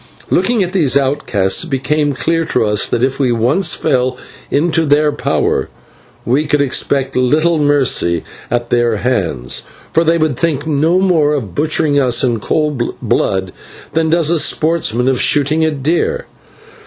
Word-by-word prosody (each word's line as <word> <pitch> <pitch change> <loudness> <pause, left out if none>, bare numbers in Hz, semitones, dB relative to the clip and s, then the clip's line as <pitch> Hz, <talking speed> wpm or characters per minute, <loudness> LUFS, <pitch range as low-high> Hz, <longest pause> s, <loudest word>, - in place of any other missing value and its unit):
Looking 235 -5 +2
at 180 +1 -5
these 150 -8 +2
outcasts 130 - 0
it - - -8
became 145 +2 0
clear 165 +5 -1
to 115 - 0
us 105 -1 +2
that, 120 - -1
if 135 +1 0
once 125 - +1
we - - +1
fell 125 0 0 0.3
into 160 +1 +1
their 150 +1 +3
power, - - -1 0.6
we 140 +6 0
could 145 0 +1
expect 135 0 -1
little 155 +6 +2
mercy 135 - +1 0.3
at 120 0 -2
their 120 -2 +2
hands, 95 - -1 0.3
for 165 - +3
they 165 +1 +2
would 155 -6 -1
think 155 -4 -1
no 160 +3 +1
more 170 -6 +2
of 115 -11 -4
butchering 150 - +1
us 125 -3 +2
in 120 -3 0
cold 150 0 -2
blood 95 -1 -1 0.4
than 160 0 0
does 165 -1 +2
a 170 - +2
sportsman 150 -8 0
of 130 -2 +1
shooting 150 +2 +2
a 160 - +2
deer. 170 - -1
145 Hz, 160 wpm, -15 LUFS, 125-160 Hz, 0.6 s, their